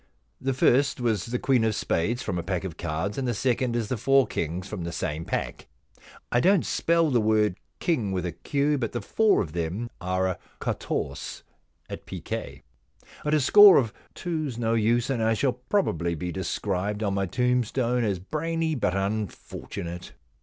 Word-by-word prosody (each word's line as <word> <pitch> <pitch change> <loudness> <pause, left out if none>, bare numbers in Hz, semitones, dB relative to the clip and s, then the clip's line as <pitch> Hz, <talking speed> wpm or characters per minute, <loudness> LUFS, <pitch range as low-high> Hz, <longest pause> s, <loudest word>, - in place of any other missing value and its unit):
The 135 0 -1
first 135 +2 +3
v/as 115 -7 0
the 125 +1 -1
queen 125 -2 +2
of 110 -1 +1
spades 110 +7 -1
from 90 -4 -2
a - - -1
pack 90 +1 -2
of 90 -4 -5
cards, 85 - -3
and 130 - -1
the 120 - 0
second 125 -1 0
is 115 -3 -1
the 125 - -2
four 135 +4 +4
kings 85 +4 -3
from 100 -5 -5
the 85 - -4
same 80 0 -3
pack. - - -3 0.6
I 120 - +3
don't 185 +4 +4
spell 165 -2 +2
the 120 -3 +3
word 105 -3 +2 0.2
king 120 - 0
with 90 -2 -2
a 90 - -2
Q, 145 - 0
but 115 -3 -2
the 120 - -2
four 220 -2 +3
of 75 - -9
them 90 +8 -3
are 95 +1 0
a 95 - -3 0.2
quatorse, - - -3 0.4
at - - -8
piquet. - - -6 0.6
But 150 +1 +2
a - - +4
score 205 +7 +8
of 115 -6 +1 0.2
two's 155 -8 -3
no 115 -1 0
use, 115 +2 +2
and 120 -4 -1
I 110 0 +2
shall 130 +3 +1
probably 125 - -1
be 90 +2 -4
described 95 +3 -2
on 100 -2 0
my 100 -1 0
tombstone 125 +1 +1
as 100 -4 0
brainy 160 - -2
but 110 -9 0
unfortunate. 95 -3 -4
115 Hz, 180 wpm, -26 LUFS, 95-135 Hz, 0.6 s, score